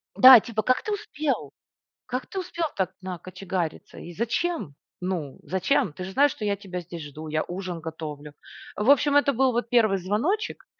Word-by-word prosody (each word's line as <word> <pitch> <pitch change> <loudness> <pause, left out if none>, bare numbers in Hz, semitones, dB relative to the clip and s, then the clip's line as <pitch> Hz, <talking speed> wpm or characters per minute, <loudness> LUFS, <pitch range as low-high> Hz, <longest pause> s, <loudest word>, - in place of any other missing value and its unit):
Да, 255 -1 +11
типа: 220 -1 -3
"Как 255 +4 +2
ты 430 - -3
успел? 310 -9 -3 0.5
Как 255 +1 -4
ты 385 - -4
успел 345 -2 -3
так 190 -2 -1
накочегариться, 185 -1 -5
и 175 - -9
зачем? 235 - -2 0.3
Ну 175 -7 -3
зачем? 190 - +1
Ты 185 - -7
же 190 - -6
знаешь, 285 +4 +4
что 215 - -8
я 200 -1 +1
тебя 185 -3 -6
здесь 170 -1 -8
жду, 150 +2 -9
я 155 0 0
ужин 180 -1 -5
готовлю". 150 -2 -7 0.4
В 210 +5 0
общем, 285 +1 +4
это 285 -1 +4
был 260 +2 +3
вот 235 -1 -2
1 220 -5 +4
звоночек 220 - -1
200 Hz, 180 wpm, -25 LUFS, 175-265 Hz, 0.5 s, Да